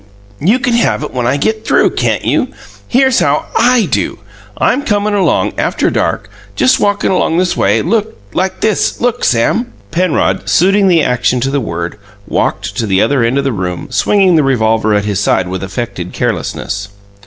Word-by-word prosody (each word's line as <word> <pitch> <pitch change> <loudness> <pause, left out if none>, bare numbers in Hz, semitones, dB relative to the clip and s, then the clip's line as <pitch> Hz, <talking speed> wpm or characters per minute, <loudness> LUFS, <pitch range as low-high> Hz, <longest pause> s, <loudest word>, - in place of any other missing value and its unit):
You 200 - +3
can 255 -2 -1
have 235 -8 +1
it 150 - -6
when 125 -2 -1
I 135 +3 +1
get 220 +8 -1
through, - - +2
can't - - -1
you? - - +1 0.4
Here's 265 0 +3
how 145 +1 +1
I 240 -1 +3
do: 105 - -2 0.4
I'm 265 - +1
comin' 210 -2 0
along 200 -2 +1
after - - 0
dark, - - -1 0.3
just 255 - +3
walkin' 205 -1 +1
along 175 -3 +1
this 180 0 +1
way - - +1
like 185 - -2
this 220 -1 0
look, 245 0 -1
Sam!" 215 - +1 0.2
Penrod, 180 +1 0
suiting 195 +3 +3
the 170 -4 +4
action 125 0 +1
to 135 - -1
the 140 0 0
word, 85 0 -5 0.3
walked - - -2
to 110 - -1
the 95 -1 +2
other 135 +2 +2
end 120 +4 +1
of 140 - +1
the 135 -2 -1
room, 95 +9 -4
swinging 190 +3 +3
the 155 - +3
revolver 110 -4 +1
at 105 0 0
his 100 -2 -1
side 95 -3 +1
with 95 0 -4
affected 95 -3 -5
carelessness. 100 0 -3
145 Hz, 180 wpm, -13 LUFS, -, 0.4 s, the